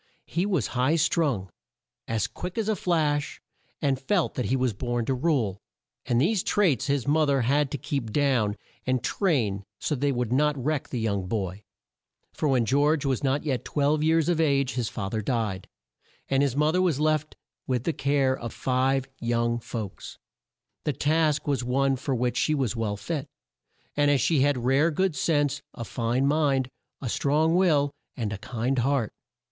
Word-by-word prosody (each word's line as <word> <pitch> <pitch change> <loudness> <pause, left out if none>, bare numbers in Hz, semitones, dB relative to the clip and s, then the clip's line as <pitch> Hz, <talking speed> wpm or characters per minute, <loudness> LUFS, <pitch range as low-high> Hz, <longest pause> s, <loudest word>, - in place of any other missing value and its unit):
He 175 +4 -1
was 180 - +1
high 130 +5 +2
strung, 145 - +1 0.6
as 110 -3 0
quick 180 +3 -6
as 220 -2 0
a 220 - +2
flash, 155 -5 0 0.4
and 135 -2 +2
felt 180 +4 +1
that 125 - -2
he 130 - +1
was 130 -3 +1
born 120 +2 -2
to 135 - 0
rule, 125 - 0 0.5
and 120 - +2
these 185 - +2
traits 170 - +2
his 140 -2 0
mo 155 +1 +3
ther 140 -2 +2
had 140 +4 +2
to 145 - -3
keep 125 -3 -3
down 120 -6 +1 0.3
and 130 -1 +1
train 115 - 0
so 150 - -2
that 140 - -2
they 145 0 +2
would 125 -2 -1
not 150 +2 +2
wreck 145 +2 -2
the 125 - -3
young 100 -4 -1
boy, 95 -2 -3 0.7
for 155 - -1
when 125 -4 +3
George 145 +4 +2
was 135 -2 0
not 140 +1 +1
yet 130 -6 -1
twelve 150 +1 +1
years 160 0 +3
of 170 -2 +2
age 140 -4 +2
his 120 -2 -1
fa 100 - -4
ther 110 - -1
died, 105 -4 -2 0.6
and 135 0 +2
his 140 -3 +1
mo 150 +2 +3
ther 180 +2 +2
was 170 -7 +1
left 155 0 0 0.3
with 125 -3 0
the 165 - 0
care 140 -2 +1
of 115 -3 -6
five 130 +1 0
young 120 0 0
folks. 110 -4 -7 0.7
The 150 - 0
task 155 +1 +1
was 140 -3 0
one 135 +2 +2
for 135 +1 -2
which 125 0 0
she 155 - +2
was 130 -5 -1
well 110 -3 -2
fit, 135 +8 -4 0.7
as 145 -1 +3
she 155 +4 +2
had 145 0 +3
rare 135 +6 +4
good 180 +1 0
sense, 145 -3 +1
a 115 - -5
fine 120 +4 0
mind, 140 -3 +2 0.3
a 135 - -3
strong 150 +7 +2
will, 150 -6 +3 0.3
and 110 -4 -2
a 100 - -6
kind 120 +4 -1
heart. 130 -2 0
135 Hz, 185 wpm, -26 LUFS, 120-150 Hz, 0.7 s, rare